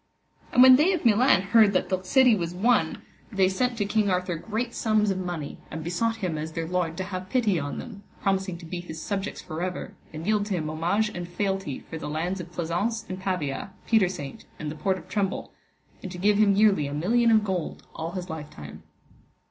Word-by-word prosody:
And 250 - +7
when 260 0 +9
they 335 +7 +4
of 345 - -3
Milan 225 -3 +5
heard 205 0 +5
that 185 - +1
thilk 185 -1 -1
city 255 -1 +6
was 175 -2 -3
won, 235 +7 +2 0.3
they 195 -3 +3
sent 240 +6 0
to 205 - 0
King 210 0 +1
Arthur 180 -1 0
great 225 +7 -3
sums 215 -2 +2
of 190 - -2
money, 175 -5 -5
and 160 - -6
besought 205 +7 0
him 160 -4 -2
as 160 +1 -5
their 165 0 -3
lord 170 -2 -1
to 190 - -2
have 185 -1 -6
pity 220 -9 +2
on 145 -1 -4
them, 215 -5 -8 0.2
promising 190 -2 0
to 170 - -11
be 175 +2 -5
his 160 -2 -8
subjects 195 +3 -4
for 160 -1 -5
ever, 180 0 -4 0.2
and 155 +1 -7
yield 210 0 +1
to 200 - -1
him 155 -3 -2
homage 180 +7 +1
and 175 -4 -6
fealty 190 -6 -2
for 160 - -8
the 150 - -5
lands 175 +5 -2
of 175 0 -10
Pleasance 180 +7 -2
and 185 0 -4
Pavia, 185 -2 -3
Petersaint, 185 -10 0
and 150 -1 -4
the - - -7
Port 190 +4 0
of 175 -1 -12
Tremble, 195 0 -2 0.5
and 190 - -6
to 180 - -7
give 205 +3 +3
him 200 -2 +5
yearly 200 -8 +4
a 140 - -4
million 230 +10 +3
of 220 -2 +5
gold 185 -5 -3
all 165 +1 -5
his 185 -1 -4
lifetime. 150 - -8
185 Hz, 215 wpm, -26 LUFS, 170-210 Hz, 0.5 s, when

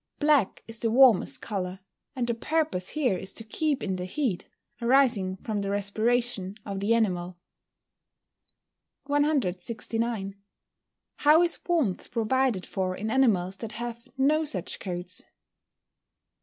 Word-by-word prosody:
Black 290 -9 +2
is 225 0 -6
the 230 - +1
warmest 250 +1 +5
colour, 190 -3 -3 0.4
and 250 -2 -1
the 235 - 0
purpose 300 - -1
here 270 -10 +1
is 190 - -4
to 225 - -3
keep 280 +4 -1
in 190 -2 -2
the 180 - -4
heat, 210 -2 -2 0.3
arising 235 -7 +3
from 210 +1 -3
the 200 - -3
respiration 205 0 0
of 195 -2 -4
the 210 +4 +2
animal. 180 -5 0 1.7
169. 230 - -1 0.8
_How 310 +4 +6
is 340 - 0
warmth 310 - 0
provided 235 -3 +1
for 185 -1 -2
in 215 +3 -3
animals 195 -8 +2
that 225 0 -6
have 235 +1 -6
no 300 +4 +3
such 190 - -2
coats? 180 -1 -4
225 Hz, 130 wpm, -27 LUFS, 190-265 Hz, 1.7 s, How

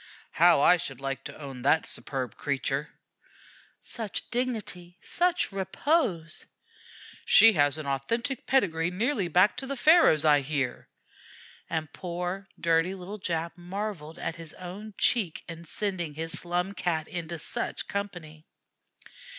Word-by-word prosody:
"How 170 -3 +5
I 180 +4 +6
should 135 -6 -5
like 135 0 -4
to - - -8
own 135 -4 -8
that 150 +5 +3
superb 130 -5 -4
creature!" 140 0 -2 0.9
"Such 220 -5 +1
dignity 215 -8 -2
such 355 - +2
repose!" 195 - 0 0.8
"She 225 0 +7
has 145 -3 +2
an 155 - -6
authentic 230 - -2
pedigree 170 -10 +2
nearly 210 +2 0
back 180 +5 +4
to 270 - -5
the 275 - -3
Pharaohs, 300 - +5
I 145 -2 +5
hear"; 135 -3 -3 0.8
and 160 -2 -3
poor, 180 +2 -4
dirty 165 +3 +2
little 195 +3 -8
Jap 170 -2 -2
marvelled 180 -3 -5
at 165 - -4
his 165 -2 -7
own 195 +4 -8
cheek 205 -10 +1
in 170 0 -8
sending 175 -5 -3
his 165 +1 -3
Slum 175 +2 -1
Cat 165 -5 -1
into 170 -2 -5
such 160 - -3
company. 175 -6 -6
175 Hz, 135 wpm, -28 LUFS, 155-200 Hz, 0.9 s, She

